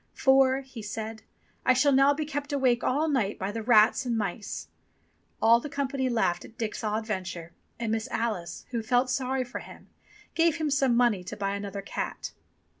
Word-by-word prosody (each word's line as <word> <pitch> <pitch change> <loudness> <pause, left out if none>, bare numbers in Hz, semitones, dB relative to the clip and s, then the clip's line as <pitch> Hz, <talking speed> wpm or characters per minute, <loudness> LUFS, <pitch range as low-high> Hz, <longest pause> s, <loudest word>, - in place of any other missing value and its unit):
"For," 265 0 +4
he 260 -4 -10
said, 220 +1 -5 0.4
"I 255 - +5
shall 275 +3 +3
now 275 +1 +5
be 300 +2 -1
kept 290 0 -4
awake 260 -4 +2
all 295 +5 +1
night 245 -9 0
by 190 +2 -3
the 225 +2 -4
rats 220 +1 +5
and 240 -3 -1
mice." 205 -1 -4 0.7
All 230 +1 +6
the 295 - -7
company 275 -2 -1
laughed 225 -7 +1
at 225 - -14
Dick's 225 0 -3
odd 215 +1 -1
venture, 180 -5 -4 0.3
and 230 -2 -2
Miss 225 +2 -1
Alice, 180 -7 -3
who 235 -2 -1
felt 245 +3 +2
sorry 260 0 0
for 245 +1 -6
him, - - -13 0.4
gave 330 -1 +3
him 310 -3 -1
some 270 -4 +3
money 235 -7 +3
to - - -6
buy 195 -1 -1
another 200 0 -5
cat. - - -4
240 Hz, 190 wpm, -28 LUFS, 215-270 Hz, 0.7 s, All